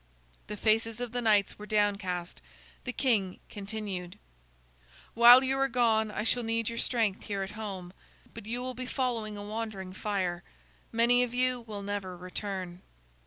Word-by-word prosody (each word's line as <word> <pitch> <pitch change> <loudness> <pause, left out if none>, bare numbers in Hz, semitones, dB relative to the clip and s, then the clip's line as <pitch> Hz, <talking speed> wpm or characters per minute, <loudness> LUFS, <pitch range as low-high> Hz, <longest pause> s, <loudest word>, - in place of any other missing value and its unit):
The 210 - -5
faces 225 +2 +1
of 245 -2 -3
the 245 0 -1
knights 210 -4 +3
were 210 - -8
downcast. 200 - 0 0.4
The - - -2
king 210 -9 +1
continued: 200 -4 -5 1.0
"While 240 +3 +9
you 265 0 +1
are 270 - +3
gone, 230 -3 +2
I 210 - -3
shall 245 +2 +2
need 230 -1 0
your 230 - -4
strength 220 -5 0
here 200 -2 -2
at 190 - -6
home, 195 -4 -6 0.4
but 200 - -9
you 240 +2 -2
will 255 0 -4
be 255 +1 -6
following 235 -6 -2
a 205 - -6
wandering 205 -3 -5
fire. 185 -4 -2 0.5
Many 240 +2 +4
of 245 -1 -1
you 255 0 +2
will 205 -2 -6
never 200 -3 -4
return." 185 0 -5
215 Hz, 165 wpm, -30 LUFS, 195-235 Hz, 1.0 s, While